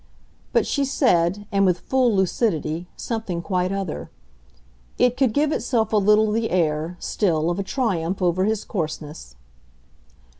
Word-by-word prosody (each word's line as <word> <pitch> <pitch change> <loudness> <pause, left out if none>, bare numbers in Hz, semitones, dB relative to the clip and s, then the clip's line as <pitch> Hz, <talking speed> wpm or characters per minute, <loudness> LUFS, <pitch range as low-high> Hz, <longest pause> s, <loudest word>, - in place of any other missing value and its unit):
But - - +2
she 280 - 0
said, 205 - +1
and 200 -1 +2
with 180 -2 +2
full 255 -4 +2
lucidity, 175 -4 0
something 210 -7 -4
quite 185 0 0
other: 195 -5 -4 0.9
it 250 0 +3
could 260 -3 +2
give 295 +6 +1
itself 225 -7 0
a - - +4
little 210 +1 +4
the 225 +1 0
air, 165 0 0
still, 165 -5 0
of 175 - -3
a - - -1
triumph 190 -5 -1
over 180 0 +1
his 215 0 -1
coarseness. 155 - -5
195 Hz, 145 wpm, -23 LUFS, 170-225 Hz, 0.9 s, a